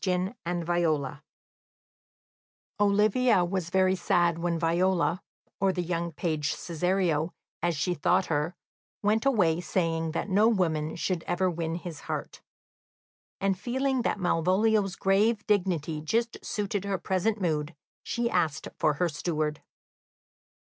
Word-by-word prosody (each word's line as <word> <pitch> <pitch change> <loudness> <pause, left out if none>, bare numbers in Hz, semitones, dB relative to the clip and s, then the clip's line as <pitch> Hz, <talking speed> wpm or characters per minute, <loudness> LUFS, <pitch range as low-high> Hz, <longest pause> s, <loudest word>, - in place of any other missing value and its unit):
Yellow 185 +1 0
Stockings 170 -5 0 1.6
Olivia 210 0 +3
was 175 -1 -2
very 185 +1 +3
sad 175 -2 +2
when 170 0 0
Viola, 175 +2 +1 0.4
or 195 0 +3
the 180 -1 -2
young 170 0 -2
page 155 -2 -1
Cesario, 175 -2 0 0.3
as 170 -3 0
she 175 +5 0
thought 180 +3 +2
her, 155 +3 -1 0.5
went 220 +5 +2
away 175 -10 +3
saying 165 -2 -1
that - - -2
no 205 +3 +4
woman 160 -8 +1
should 175 0 -1
ever 185 +1 +1
win 165 -1 -3
his 170 -3 -6
heart; - - -5 1.0
and 195 -1 0
feeling 265 +2 0
that 220 - -1
Malvolio's 190 +3 +2
grave 205 +3 +2
dignity 175 -7 0
just 230 +9 -1
suited 205 -1 -2
her 200 -1 -1
present 190 +5 0
mood, 155 -3 -1 0.3
she 235 0 -1
asked 155 -8 0
for 150 - +2
her 180 +3 +1
steward. 155 -1 -2
180 Hz, 130 wpm, -28 LUFS, 165-195 Hz, 1.6 s, no